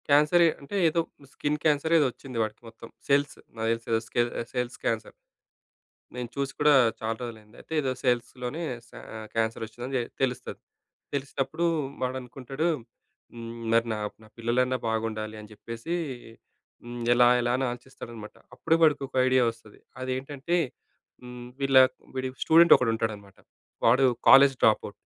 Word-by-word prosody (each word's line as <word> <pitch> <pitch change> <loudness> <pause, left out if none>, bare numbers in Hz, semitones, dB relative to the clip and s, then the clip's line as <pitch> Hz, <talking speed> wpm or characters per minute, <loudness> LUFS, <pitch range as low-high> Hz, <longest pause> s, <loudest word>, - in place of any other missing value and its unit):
క్యాన్సరే, 150 +4 +5 0.2
అంటే 140 +8 -7
ఏదో 165 +2 +1 0.3
skin 150 +1 -1
cancer 155 +1 +2
ఏదో 150 - +4
వచ్చింది 130 -1 -10
వాడికి 110 -1 -6
మొత్తం 115 0 -12 0.2
సెల్స్ 140 0 +2 0.2
నాకు 110 0 -1 0.2
తెలిసి 115 0 -1 0.4
సెల్స్ 125 -1 -3
క్యాన్సర్. - - -2 1.0
నేను 125 -1 -4
చూసి 140 -1 -2
కూడా 150 0 +6 0.3
చాలా 110 0 -2
రోజులైంది. 110 -2 -9
అయితే - - -14
ఏదో 135 -3 -1
సెల్స్‌ 120 -2 +1
లోనే 145 +7 -3 0.3
స - - -24 0.2
ఆహ్, 110 0 -7
క్యాన్సర్ 115 0 -1
వచ్చిందని 125 +4 -4 0.2
తెలుస్తది. 125 -2 -2 0.5
తెలిసినప్పుడు 140 +3 -2 0.4
వాడనుకుంటాడు 130 +4 -3 0.7
హ్మ్. 115 -1 -7 0.2
మరి 115 +1 +4
నా, 110 - -2 0.2
నా - - -15
పిల్లలన్నా 125 +2 +1
బాగుండాలి 110 -1 -3
అని 105 0 -13
చెప్పేసి 115 +9 -6 0.9
హ్మ్, 120 0 -7
ఎలా 120 0 +6
ఎలా 120 0 0
అని 135 - -1
ఆలోచిస్తాడనమాట. 120 -3 -10 0.2
అప్పుడు 160 - +1
వాడికి 150 -3 +4
ఒక - - -35
ఐడియా 130 0 +4
వస్తది. 115 -2 -16 0.2
అదేంటంటే 135 +5 -2 0.7
హ్మ్, 125 0 -9
వీళ్ళ 135 -1 +2 0.4
వీడి 130 0 -2 0.2
స్టూడెంట్ 165 +1 +6
ఒకడుంటాడన్నమాట. 110 -4 -2 0.5
వాడు 130 +4 +5 0.2
కాలేజ్ 135 0 +8
డ్రాపౌట్. 105 -2 +2
125 Hz, 135 wpm, -27 LUFS, 115-140 Hz, 1.0 s, కాలేజ్